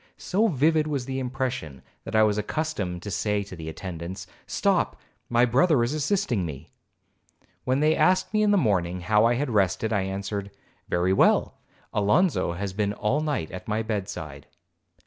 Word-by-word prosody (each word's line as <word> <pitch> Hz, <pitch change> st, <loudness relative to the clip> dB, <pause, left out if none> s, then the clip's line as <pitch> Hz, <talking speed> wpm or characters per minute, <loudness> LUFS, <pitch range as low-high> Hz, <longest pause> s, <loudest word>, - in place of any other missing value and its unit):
So 210 Hz, +5 st, +1 dB
vivid 155 Hz, -, +2 dB
was 140 Hz, -5 st, -2 dB
the 135 Hz, 0 st, -3 dB
impression, 125 Hz, -, -4 dB, 0.2 s
that -, -, -5 dB
I 110 Hz, -, +6 dB
was 105 Hz, -1 st, +2 dB
accustomed 105 Hz, -, -3 dB
to 100 Hz, -, -5 dB
say 105 Hz, +1 st, 0 dB
to 95 Hz, -2 st, -10 dB
the 80 Hz, -2 st, -7 dB
attendants, 90 Hz, +2 st, -6 dB, 0.2 s
'Stop, -, -, +1 dB, 0.3 s
my 120 Hz, +1 st, +4 dB
brother 135 Hz, +2 st, +3 dB
is 120 Hz, +4 st, -1 dB
assisting 155 Hz, -, 0 dB
me.' 75 Hz, -2 st, -7 dB, 1.0 s
When 130 Hz, +2 st, +1 dB
they 155 Hz, +1 st, +4 dB
asked 185 Hz, +3 st, +2 dB
me 215 Hz, -, +3 dB
in 210 Hz, -, +3 dB
the 205 Hz, -, +4 dB
morning 90 Hz, -, +1 dB
how 105 Hz, +4 st, +3 dB
I 120 Hz, +1 st, +3 dB
had 135 Hz, +1 st, -1 dB
rested? 105 Hz, +2 st, +1 dB
I 100 Hz, -, +2 dB
answered, 100 Hz, +1 st, -4 dB, 0.4 s
'Very 90 Hz, +2 st, +2 dB
well,—Alonzo 105 Hz, -, +1 dB
has 95 Hz, +2 st, -4 dB
been 100 Hz, 0 st, 0 dB
all 115 Hz, +8 st, 0 dB
night 145 Hz, -, -2 dB
at 90 Hz, 0 st, -8 dB
my 110 Hz, +1 st, 0 dB
bed 105 Hz, -3 st, -3 dB
side.' 75 Hz, -7 st, -8 dB
105 Hz, 170 wpm, -26 LUFS, 95-140 Hz, 1.0 s, I